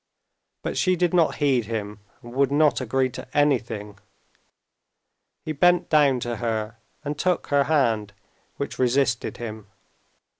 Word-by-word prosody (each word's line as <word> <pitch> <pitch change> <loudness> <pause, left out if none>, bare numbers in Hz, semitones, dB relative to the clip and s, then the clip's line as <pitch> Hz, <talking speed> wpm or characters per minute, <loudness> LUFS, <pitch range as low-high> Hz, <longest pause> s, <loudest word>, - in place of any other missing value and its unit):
But - - -3
she 185 -1 +3
did 175 0 0
not 170 -3 +3
heed 135 -6 +1
him, 105 -2 -5 0.2
and 120 0 -10
would 140 +1 +2
not 145 -1 +3
agree 130 +1 0
to - - -8
anything. 115 -8 0 1.5
He 155 - -3
bent 175 +4 +3
down 145 -4 +4
to 120 -1 -3
her 110 -2 -3 0.3
and 145 +1 -4
took 180 -1 0
her 140 -1 +3
hand, 115 -9 +1 0.4
which 140 - -5
resisted 130 0 +1
him. 110 -3 -7
130 Hz, 140 wpm, -24 LUFS, 115-145 Hz, 1.5 s, down